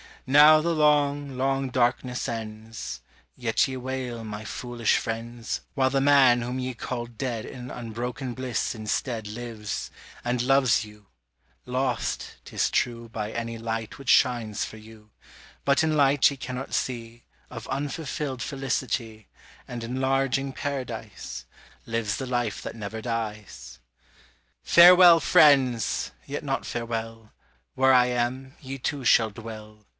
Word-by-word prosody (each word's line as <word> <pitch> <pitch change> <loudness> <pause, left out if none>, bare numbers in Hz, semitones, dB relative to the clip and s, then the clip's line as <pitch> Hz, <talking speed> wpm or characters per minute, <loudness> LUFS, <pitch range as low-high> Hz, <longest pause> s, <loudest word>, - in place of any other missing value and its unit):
Now 150 +3 +7
the 170 +1 0
long, 145 -2 +2
long 135 0 0
darkness 125 0 0
ends. 110 -1 -6 0.3
Yet 115 +1 +1
ye 130 - -5
wail, 125 -2 -4
my 105 0 -7
foolish 120 -1 0
friends, 115 +1 -4
While 130 -2 +2
the 135 +1 +1
man 135 -4 +5
whom 125 +2 -3
ye 130 0 -3
call 120 0 -4
"dead" 120 -1 -4
In 125 0 -8
unbroken 125 +2 -5
bliss 130 0 -2
instead 110 0 -3
Lives, 110 -1 -5 0.3
and 120 0 0
loves 130 -3 +3
you: 105 -1 -16 0.6
lost, 125 -1 -2
'tis - - 0
true 115 -1 -1
By 110 -1 -4
any 115 0 -4
light 115 -1 -4
which 135 -3 -6
shines 120 -5 +3
for 110 - -7
you; 110 -1 -15 0.5
But 140 +3 +3
in 155 -1 +1
light 140 -1 +5
ye 140 - -7
cannot 130 0 -6
see 120 -2 -3 0.2
Of 115 -3 -8
unfulfilled 140 -1 -3
felicity, 120 -5 -3 0.4
And 120 -1 -6
enlarging 135 +2 0
Paradise; 125 -8 -5 0.4
Lives 115 -2 -1
the 130 - -4
life 120 -4 -1
that - - -7
never 110 0 -6
dies. 105 - -5 0.8
Farewell, 175 0 +8
friends! 130 -9 +4
Yet - - -5
not - - -2
farewell; 115 -2 -5 0.4
Where 130 0 +4
I 125 -1 +6
am, 125 +2 -2
ye 135 0 -6
too 135 +1 -3
shall 110 -1 +5
dwell. 105 -1 -10
120 Hz, 135 wpm, -26 LUFS, 115-135 Hz, 0.8 s, Farewell